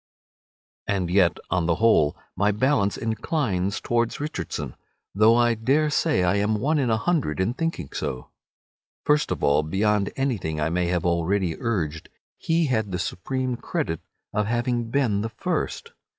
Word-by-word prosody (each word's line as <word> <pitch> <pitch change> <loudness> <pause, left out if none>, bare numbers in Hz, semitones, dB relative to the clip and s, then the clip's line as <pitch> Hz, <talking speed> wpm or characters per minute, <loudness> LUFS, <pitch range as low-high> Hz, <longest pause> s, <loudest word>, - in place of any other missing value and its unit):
And 95 -4 -1
yet, 90 -2 +4
on 85 -2 +1
the 85 - +3
whole, 90 -8 +3 0.2
my 100 +2 +2
balance 105 -2 +1
inclines 110 - -1
towards 120 -1 0
Richardson, 85 - -4 0.4
though 110 +3 +5
I 120 0 +4
dare 140 +7 +1
say 95 -9 +2
I 90 +3 +2
am 105 +2 +1
one 150 +6 +1
in 130 -4 +1
a 110 - +3
hundred 140 - 0
in 95 +6 +1
thinking 165 - -3
so. 65 -1 -4 0.7
First 150 0 +3
of - - -3
all, 70 +1 +4
beyond 100 +5 +1
anything 110 - -1
I 75 +2 0
may 90 0 0
have 90 -1 0
already 85 +1 +1
urged, 80 -10 -2 0.3
he 165 0 +1
had 110 -7 0
the 90 - -1
supreme 130 +8 -2
credit 80 -7 -3 0.3
of 105 0 0
having 120 0 -1
been 115 -6 +1
the 110 - -2
first. 185 - -3
105 Hz, 160 wpm, -24 LUFS, 90-125 Hz, 0.7 s, though